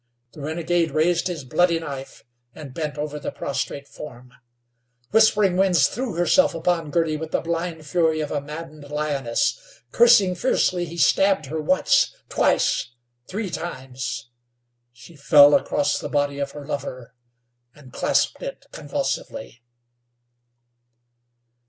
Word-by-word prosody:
The 150 - -11
renegade 165 +2 0
raised 170 +3 +2
his 170 -5 -5
bloody 170 +6 +2
knife, 140 -4 -8 0.3
and 145 -4 -10
bent 150 -1 -4
over 150 0 -4
the - - -4
prostrate 140 0 -4
form. 125 -4 -11 0.8
Whispering 210 -4 +4
Winds 185 -5 +4
threw 245 -1 -4
herself 175 +10 +3
upon 165 -1 0
Girty 160 0 0
with 160 +1 -6
the - - 0
blind 165 -1 -4
fury 160 0 +1
of 150 -1 -3
a 145 - -1
maddened 150 0 -9
lioness. 145 -5 -1 0.3
Cursing 230 -6 +5
fiercely, 180 -3 +1
he 170 +1 -9
stabbed 195 -2 +3
her 155 +3 -4
once, 185 +5 +2
twice, 120 - +1 0.3
three 200 -1 -4
times. 130 -7 -6 0.6
She 120 +8 -16
fell 145 0 +6
across 145 0 +1
the - - -6
body 145 -1 0
of 140 -1 -3
her 145 -1 -9
lover, 130 -4 -6 0.6
and 135 -4 -16
clasped - - 0
it - - -7
convulsively. 120 - -4
155 Hz, 130 wpm, -23 LUFS, 140-175 Hz, 0.8 s, fell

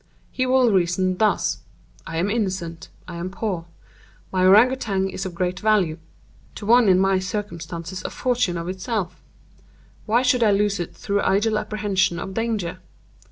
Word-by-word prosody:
He 255 0 -1
will 255 -2 +4
reason 185 0 +1
thus:—'I 210 -5 -2
am 185 +5 0
innocent; 185 -7 -3 0.2
I 175 -2 -7
am 175 +2 -4
poor; 190 -4 -3 0.7
my 185 -1 +1
Ourang 210 +7 +7
Outang 195 -7 -1
is 190 +1 -4
of 175 - -9
great 180 +1 -1
value—to 185 -2 -3
one 235 0 +5
in 185 - +5
my 195 0 +3
circumstances 185 -2 -5
a - - -3
fortune 240 -9 0
of 170 0 -5
itself—why 205 +4 -5
should 250 -1 +3
I 220 - +5
lose 200 0 +1
it 175 - -5
through 200 0 -1
idle 210 +2 +2
apprehensions 200 -5 0
of 190 - -6
danger? 220 -6 -2
195 Hz, 150 wpm, -23 LUFS, 180-215 Hz, 0.7 s, Ourang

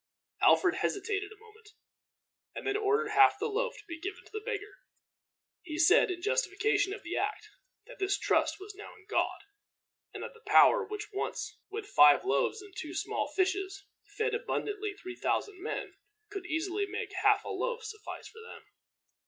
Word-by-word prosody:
Alfred - - +5
hesitated 405 +1 -1
a 440 - -13
moment, 440 -1 -18 0.9
and - - -6
then 405 - 0
ordered 425 +2 +1
half 410 -2 +6
the 420 - -2
loaf 475 +3 -1
to 420 - -14
be 330 -2 -7
given 390 +3 -6
to - - -18
the 430 - -5
beggar. 415 -4 -5 0.8
He 310 -3 -6
said, 360 +9 +6
in 350 -1 -4
justification 415 -3 +1
of 410 +1 -6
the 350 +1 -4
act, 415 +1 -2 0.4
that - - -13
his 390 +1 +1
trust - - +1
was 400 +2 -9
now 415 +2 -11
in - - -20
God, 430 - 0 0.7
and - - -7
that - - -7
the 455 - -18
power - - +7
which 420 0 -7
once, 395 - -4
with 420 +1 -5
five 145 - +6
loaves 140 - +1
and 405 -2 -14
two - - -6
small - - -1
fishes, 385 +1 0 0.3
fed 450 +1 +1
abundantly 420 -3 -2
three 370 -2 -8
thousand 390 0 -1
men, - - -4 0.4
could 390 -3 -6
easily 365 +5 -1
make 420 +1 -4
half 415 +1 +4
a - - -5
loaf 485 -1 -2
suffice 435 -1 -8
for 450 - -13
them. 460 - -11
410 Hz, 175 wpm, -31 LUFS, 390-435 Hz, 0.9 s, power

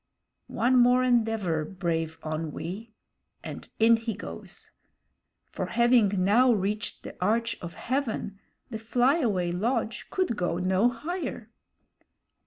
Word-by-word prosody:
One 250 +3 +2
more 250 +1 +5
endeavor, 225 -10 +1
brave 165 -2 -3
Onwee, 165 +7 -5 0.5
and - - -8
in 230 +1 +5
he 225 -2 -4
goes; 80 - -9 0.8
for 185 - -3
having 230 -4 +3
now 240 +7 +5
reached 210 +1 -2
the - - -8
arch 230 +4 +1
of 170 -1 -7
heaven, 235 -6 -3 0.3
the 220 - -4
flyaway 230 - +1
lodge 220 +4 -1
could 370 -11 0
go 175 -3 -1
no 190 +5 +2
higher. 260 - -5
220 Hz, 115 wpm, -27 LUFS, 185-240 Hz, 0.8 s, more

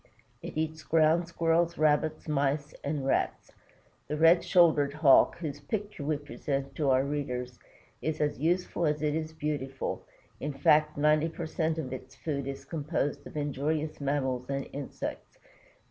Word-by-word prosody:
It - - -7
eats 160 0 -2
Ground 160 +2 +3
Squirrels, 170 0 +1
Rabbits, 155 +1 +1
Mice, 145 0 0
and 140 -1 -2
Rats. 135 - 0 0.6
The 150 - -2
Red 165 +2 +6
shouldered 160 -6 +4
Hawk, 150 -3 +5
whose 150 -4 -5
picture 200 +2 -4
we 150 +1 0
present 140 -1 -4
to 145 -3 +1
our 130 0 +4
readers, 125 -4 -3 0.4
is 155 0 -2
as 150 -2 0
useful 175 +1 +1
as 150 0 -1
it 150 -1 +1
is 160 0 -2
beautiful, 145 -4 -3 0.4
in 145 0 -3
fact 150 +2 +3
ninety 150 +2 +3
per 165 +1 -5
cent 160 0 -1
of 135 -5 -4
its 130 0 -9
food 140 -4 -3
is 135 0 -6
composed 145 -1 -2
of - - -9
injurious 150 +2 -2
mammals 130 -3 -1
and 135 -1 -2
insects. 140 -1 -6
150 Hz, 155 wpm, -29 LUFS, 140-160 Hz, 0.6 s, Red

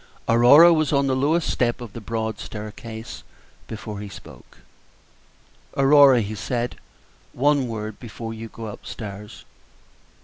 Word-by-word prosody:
Aurora 140 +9 +7
was 155 -2 +1
on 140 -1 +2
the 135 -1 +1
lowest 150 +5 +1
step 120 0 0
of 120 -4 -9
the 115 - -8
broad 110 0 -4
staircase 110 +1 -8 0.5
before 110 -2 -7
he 105 0 -7
spoke. - - -14 1.2
"Aurora," 135 -2 +6
he 105 0 -4
said, 120 +3 -3 0.6
"one 140 0 +2
word 110 -2 -6
before 115 -1 -7
you 115 0 -8
go 115 0 -9
up 105 - -9
stairs." 105 -1 -9
115 Hz, 135 wpm, -23 LUFS, 110-135 Hz, 1.2 s, Aurora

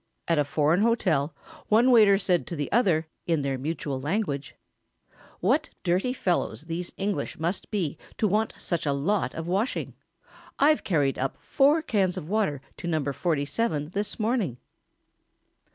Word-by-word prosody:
At 165 -3 +2
a - - +4
foreign 155 +5 +2
hotel 170 -11 +1 0.3
one 235 +4 +5
waiter 210 -5 +7
said 180 -3 +1
to 170 - -4
the 145 -2 -3
other 180 -9 +3 0.2
in 165 -4 +1
their 135 -1 -1
mutual 140 -2 -3
language: 150 -3 -2 0.9
"What - - +2
dirty 185 +8 +1
fellows 180 -10 -1
these 170 +2 -4
English 200 0 -2
must 170 +4 -2
be 175 -8 -2 0.2
to 215 - +2
want 215 +3 0
such 170 -3 -2
a 140 - +2
lot 150 +1 0
of 165 - -4
washing! 195 +8 -1 0.6
I've 300 +2 +4
carried 145 -7 +1
up 135 +1 -2
four 290 +3 +3
cans 195 - +1
of 150 - -5
water 190 -9 0 0.2
to 175 - -6
No. 160 -3 0
47 150 - -1
this 205 +4 -2
morning!" 215 - 0
175 Hz, 150 wpm, -26 LUFS, 150-210 Hz, 0.9 s, waiter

